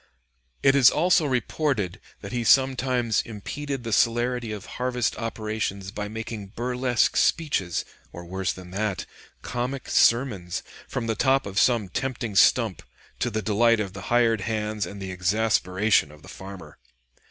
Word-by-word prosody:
It 135 - +6
is 135 -4 +8
also 170 0 +3
reported 125 - -1 0.2
that - - -8
he 120 -1 -1
sometimes 130 -3 +3
impeded 135 +5 -6
the 115 -2 -3
celerity 120 0 +1
of 105 -1 -6 0.2
harvest 125 -2 0
operations 110 -4 -3
by 105 0 -4
making 110 -2 -7
burlesque 125 0 +1
speeches, 120 - +1 0.3
or 85 - -9
worse 95 +1 -2
than 90 -1 -10
that, 100 -2 -2 0.4
comic 125 +3 -3
sermons, 115 -8 +2 0.2
from - - -3
the 115 - 0
top 135 +5 +2
of 100 0 -1
some 115 -5 +3
tempting 120 +1 -3
stump, - - +4 0.4
to 120 - 0
the 110 -1 -3
delight 115 +2 +3
of 100 -3 -3
the 95 - -8
hired 115 -3 +3
hands 105 -2 -2
and 100 +3 -8
the 95 -1 -5
exasperation 95 -1 +1
of 75 0 -16
the - - -13
farmer. 95 -1 -10
110 Hz, 150 wpm, -25 LUFS, 100-125 Hz, 0.4 s, is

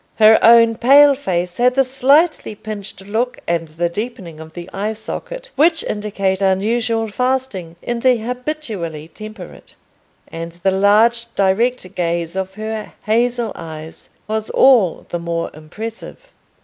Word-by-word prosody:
Her 220 0 +6
own 230 -1 +6
pale 280 +4 +7
face 180 -9 -3
had 250 +1 +3
the 270 - +4
slightly 270 +1 +2
pinched 205 -2 -8
look 225 +6 -2
and 170 -1 -1
the 165 +3 -2
deepening 180 -4 -6
of 160 0 -11
the 175 0 -8
eye 210 +3 -2
socket - - -7
which 325 +2 +3
indicate 200 -2 -2
unusual 225 +4 +1
fasting 250 -8 -2
in 240 0 -2
the 255 0 +3
habitually 225 - -5
temperate, 215 -3 -11 0.5
and 165 0 -7
the 190 - +3
large 215 +5 +3
direct 200 +1 +1
gaze 170 -1 -2
of 190 0 -4
her 215 0 -5
hazel 235 +1 +1
eyes 160 0 -9 0.2
was 220 0 -2
all 235 -10 +4
the 175 - -3
more 170 0 -3
impressive. 215 +9 -8
215 Hz, 135 wpm, -18 LUFS, 180-245 Hz, 0.5 s, pale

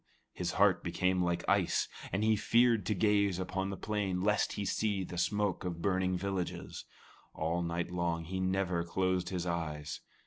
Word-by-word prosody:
His 90 -1 -2
heart 95 -4 +4
became 90 +2 +1
like 85 -1 -1
ice, - - +2 0.2
and 100 +3 0
he 110 0 +4
feared 115 -1 +3
to 105 - +1
gaze 100 -1 +2
upon 95 +1 -2
the 100 - -4
plain 100 -3 -1
lest 105 +2 +1
he 100 - -3
see 100 0 0
the 90 - -7
smoke 100 +2 0
of 90 -2 -3
burning 95 -1 +1
villages. 95 -1 -4 0.5
All 85 +3 -1
night 85 +1 -2
long 85 -2 -1
he 95 +3 -4
never 95 -2 0
closed 90 +1 0
his 90 -2 -3
eyes. 75 -3 -3
95 Hz, 170 wpm, -32 LUFS, 85-100 Hz, 0.5 s, heart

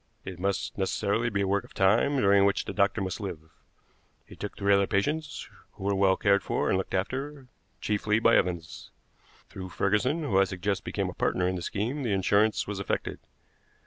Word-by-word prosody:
It 95 -2 -7
must 100 +1 -2
necessarily 100 +4 0
be 100 -3 -1
a 100 - 0
work 100 +1 +1
of - - -17
time, 110 +9 +3
during 100 -4 +4
which 100 0 +1
the - - -5
doctor 100 +1 +1
must 95 +1 -3
live. 80 -5 -7 0.7
He - - -13
took 105 - -7
three 100 0 +3
other 100 0 +3
patients, 150 +10 -2 0.3
who - - -11
were 100 +1 +1
well 95 -1 +3
cared 100 -1 +3
for - - -1
and - - +2
looked 95 - -3
after, 135 +8 -3 0.4
chiefly 105 0 +1
by 115 +1 +4
Evans. 85 -3 -1 0.6
Through 95 -1 -8
Ferguson, 125 - 0
who 100 -10 +2
I 95 - +5
suggest 95 +1 -2
became - - -2
a - - -6
partner 90 0 0
in 95 - -1
the 90 - -4
scheme, 115 +11 -2
the 115 -6 -1
insurance 100 +3 +2
was 100 -1 -5
effected. 100 - -3
100 Hz, 195 wpm, -28 LUFS, 95-110 Hz, 0.7 s, I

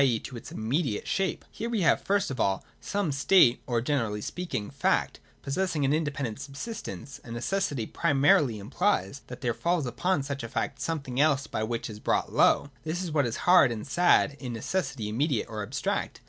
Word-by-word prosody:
e. 125 -4 +3
to 125 - -8
its 115 - -9
immediate 120 +1 -1
shape. 190 -1 -1
Here 230 - -4
we 225 -4 0
have, 165 - +4
first 200 -2 +1
of 130 - -5
all, 95 -1 +1
some 200 -6 -1
state 140 -2 +5
or, 120 -2 +1
generally 115 -6 -1
speaking, 130 - -4
fact, - - 0 0.2
possessing 155 0 0
an 135 - +2
independent 140 -7 -2
subsistence: 140 - -7
and 115 -1 -7
necessity 140 - -1
primarily 135 -2 +3
implies 140 - 0
that 125 0 -9
there 120 -3 0
falls 170 +6 0
upon 140 +6 0
such 140 0 -4
a 115 - -6
fact 130 +2 -3
something 135 -4 -3
else 145 -2 +3
by 110 - -3
which 115 +1 -2
it 110 - -7
is 105 - -10
brought - - 0
low. 145 - +4
This 170 +4 -2
is 175 - -4
what 145 -4 +2
is 115 - -4
hard 180 -8 +7
and 110 -2 -5
sad 150 -1 +3
in 125 -4 -5
necessity 135 - -2
immediate 125 +2 0
or 110 -1 -5
abstract. 110 +7 -2
140 Hz, 190 wpm, -28 LUFS, 115-165 Hz, 0.2 s, hard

